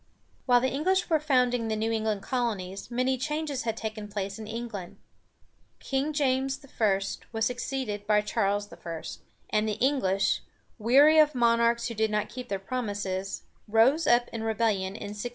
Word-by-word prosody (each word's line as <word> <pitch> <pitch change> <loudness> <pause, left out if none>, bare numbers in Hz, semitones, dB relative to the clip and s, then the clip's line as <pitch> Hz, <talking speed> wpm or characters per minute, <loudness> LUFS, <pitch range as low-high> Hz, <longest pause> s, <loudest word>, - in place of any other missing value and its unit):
While 245 -1 +5
the 260 - +1
English 360 +6 +1
were 315 - +4
founding 250 -5 +2
the 220 - 0
New 220 +1 -1
England 215 -3 -1
colonies, 210 -7 -3
many 255 +1 0
changes 300 -1 -2
had 225 -1 -1
taken 215 -1 -5
place 200 0 -4
in 215 - -7
England. 225 -5 -6 0.8
King 275 +2 -1
James 270 -1 0 0.2
I. 200 -3 +4 0.3
was 225 -1 0
succeeded 245 -4 -3
by 210 -1 +4
Charles 205 0 0
I., 165 -2 -7 0.5
and 215 0 +2
the - - 0
English, 215 -5 +1 0.4
weary 280 +8 +6
of 300 -2 +5
monarchs 235 -1 +3
who 230 - -4
did 220 0 +1
not 210 0 -1
keep 250 0 -8
their 200 - -1
promises, 195 -3 -3 0.2
rose 235 +9 +4
up 240 0 +4
in 230 - -5
rebellion 215 -4 0
in - - -6
1643. 210 +4 -4
230 Hz, 165 wpm, -28 LUFS, 210-260 Hz, 0.8 s, weary